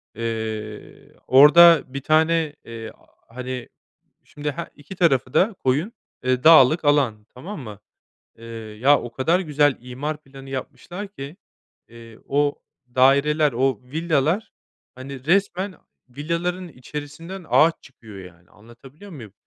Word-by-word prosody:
Eee, 110 Hz, -2 st, -6 dB
orada 150 Hz, +4 st, +7 dB
bir 135 Hz, +1 st, -7 dB
tane, 160 Hz, 0 st, +1 dB
eee, 115 Hz, -1 st, -8 dB, 0.4 s
hani, 125 Hz, +1 st, -7 dB, 0.5 s
şimdi 150 Hz, 0 st, -5 dB
he 170 Hz, +5 st, -6 dB
2 145 Hz, +6 st, -12 dB
tarafı 135 Hz, -8 st, +1 dB
da 210 Hz, +3 st, +3 dB
koyun, 150 Hz, -, -1 dB, 0.3 s
eee, 130 Hz, 0 st, 0 dB
dağlık 155 Hz, 0 st, +6 dB
alan, 130 Hz, -8 st, +1 dB
tamam 165 Hz, +8 st, -8 dB
mı? 105 Hz, -5 st, -10 dB, 0.6 s
Eee, 115 Hz, -, -13 dB, 0.4 s
ya 145 Hz, +2 st, +5 dB
o 120 Hz, -, -8 dB
kadar 160 Hz, +9 st, +1 dB
güzel 145 Hz, -5 st, +1 dB
imar 145 Hz, +5 st, -6 dB
planı 135 Hz, 0 st, -13 dB
yapmışlar 145 Hz, +9 st, -7 dB
ki, 155 Hz, -3 st, -10 dB, 0.5 s
eee, 115 Hz, -1 st, -14 dB
o 145 Hz, +1 st, 0 dB, 0.4 s
daireler, 140 Hz, +3 st, +3 dB
o 130 Hz, -1 st, 0 dB
villalar, 160 Hz, -, -1 dB, 0.4 s
hani, 130 Hz, 0 st, -9 dB
resmen 190 Hz, +2 st, 0 dB, 0.3 s
villaların 170 Hz, +6 st, -3 dB
içerisinden 150 Hz, +6 st, -9 dB
ağaç 160 Hz, +2 st, +5 dB
çıkıyor 110 Hz, -6 st, -14 dB
yani. 85 Hz, -1 st, -15 dB
Anlatabiliyor 130 Hz, -, -16 dB
muyum? 115 Hz, -, -11 dB
140 Hz, 125 wpm, -22 LUFS, 125-165 Hz, 0.6 s, orada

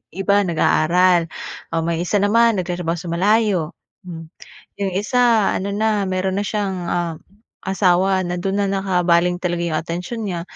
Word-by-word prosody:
iba 195 Hz, +2 st, +1 dB
nag-aaral 175 Hz, 0 st, +2 dB, 0.4 s
o 165 Hz, -, 0 dB
may 170 Hz, 0 st, -1 dB
isa 180 Hz, +4 st, -1 dB
naman 225 Hz, +2 st, +3 dB
nagtatrabaho 175 Hz, -2 st, -2 dB
sa 170 Hz, -, -7 dB
malayo, 195 Hz, -3 st, +1 dB, 0.4 s
hmm, 165 Hz, -2 st, -8 dB, 0.5 s
yung 195 Hz, -, 0 dB
isa 230 Hz, 0 st, +2 dB
ano 195 Hz, -, -3 dB
na 210 Hz, -1 st, +1 dB
meron 185 Hz, +1 st, -1 dB
na -, -, -2 dB
siyang, 205 Hz, -3 st, -2 dB
ah, 175 Hz, -2 st, -1 dB, 0.5 s
asawa 190 Hz, 0 st, +2 dB
na 175 Hz, 0 st, -3 dB
dun 195 Hz, +2 st, -2 dB
na -, -, +1 dB
nakabaling 180 Hz, -2 st, +1 dB
talaga 175 Hz, -1 st, -1 dB
yung 165 Hz, -2 st, -1 dB
atensyon 180 Hz, +8 st, -5 dB
niya, 170 Hz, -2 st, -3 dB
185 Hz, 155 wpm, -20 LUFS, 175-200 Hz, 0.5 s, naman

